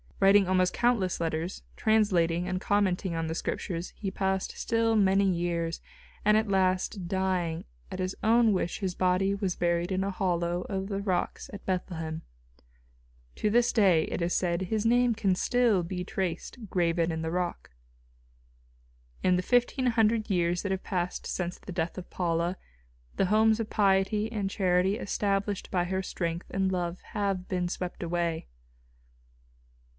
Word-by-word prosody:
Writing 195 0 +6
almost 185 -1 +2
countless 235 -7 +1
letters, 165 +2 -3
translating 180 -6 +2
and 185 0 -2
commenting 190 -3 +1
on 165 0 -1
the 160 0 -3
Scriptures 170 0 -3
he 195 -2 -4
passed 190 -1 -1
still 225 0 +1
many 195 -1 +4
years, 170 -2 -1 0.4
and 210 +1 +5
at 220 0 +1
last, 185 -1 +1
dying, 180 -3 -1 0.3
at - - -4
his 185 +1 -2
own 230 0 +5
wish 180 -2 -1
his 190 -3 -2
body 185 +2 +2
was 195 -3 -1
buried 170 +1 0
in 190 0 0
a 200 - -1
hollow 175 -2 0
of 195 0 -3
the 200 -1 -2
rocks 185 -3 -2
at 200 - -9
Bethlehem. 165 -4 -3 1.2
To 210 - +1
this 240 +2 +3
day, 185 -8 +4
it - - -4
is 170 +1 0
said, 175 0 0
his 215 +3 -1
name 240 0 +3
can 200 -3 +2
still 235 0 +2
be 180 +1 -4
traced 190 +5 -4
graven 170 -2 +1
in 160 0 -3
the 160 - -2
rock. 175 - -3 1.5
In 180 -1 +4
the 180 - -1
fifteen 245 +3 +2
hundred 225 -2 +2
years 175 -1 +1
that 200 - -3
have 190 0 -2
passed 180 -2 -2
since 180 -1 -3
the - - -9
death 170 0 -2
of 185 - -7
Paula, 170 0 0 0.6
the - - +3
homes 220 +2 +4
of 225 - -3
piety 205 +2 +2
and 200 -4 -2
charity 185 +1 +2
established 200 -1 -1
by 180 -2 +1
her 190 +1 -2
strength 170 -2 -3
and 190 -1 0
love 175 -1 -2
have 195 -3 -1
been 180 -2 -1
swept 180 0 -5
away. 170 -1 -1
185 Hz, 160 wpm, -28 LUFS, 175-205 Hz, 1.5 s, Writing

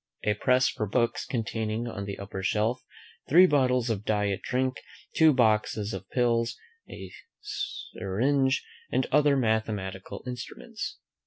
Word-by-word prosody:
A 105 - +2
press 125 +5 +3
for 110 - -2
books; 115 +3 0
containing 115 -1 -2
on 100 -4 -5
the 100 0 -5
upper 100 -1 -6
shelf 110 +6 0 0.5
Three 175 +6 +8
bottles 125 -6 +2
of 105 -2 -2
diet 105 -3 0
drink. 130 +1 -1 0.4
Two 160 -1 +6
boxes 110 -4 +2
of 95 0 -7
pills. 120 -2 +1 0.3
A - - -9 0.3
syringe, 135 - -1 0.3
and 130 - +1
other 145 -1 +4
mathematical 110 -5 -2
instruments. 215 - -6
115 Hz, 130 wpm, -28 LUFS, 105-130 Hz, 0.5 s, Three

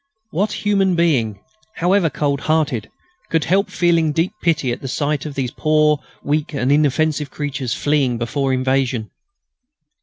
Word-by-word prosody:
What 205 +5 -2
human 195 -3 +3
being, 125 -12 +1 0.3
however 180 0 +2
cold 140 -2 -1
hearted, 150 -9 0 0.4
could 160 -2 +1
help 195 +3 +1
feeling 165 -3 +2
deep 165 +6 0
pity 155 -7 +1
at 120 - -4
the 135 - -5
sight 145 +2 -1
of 145 - -8
those 130 -3 -2
poor, 155 -1 +2 0.2
weak 150 +1 -1
and 130 0 +1
inoffensive 150 0 +2
creatures 135 -4 -3
fleeing 140 -5 +1
before 135 +4 -1
invasion? 130 -3 0
150 Hz, 145 wpm, -20 LUFS, 130-165 Hz, 0.4 s, human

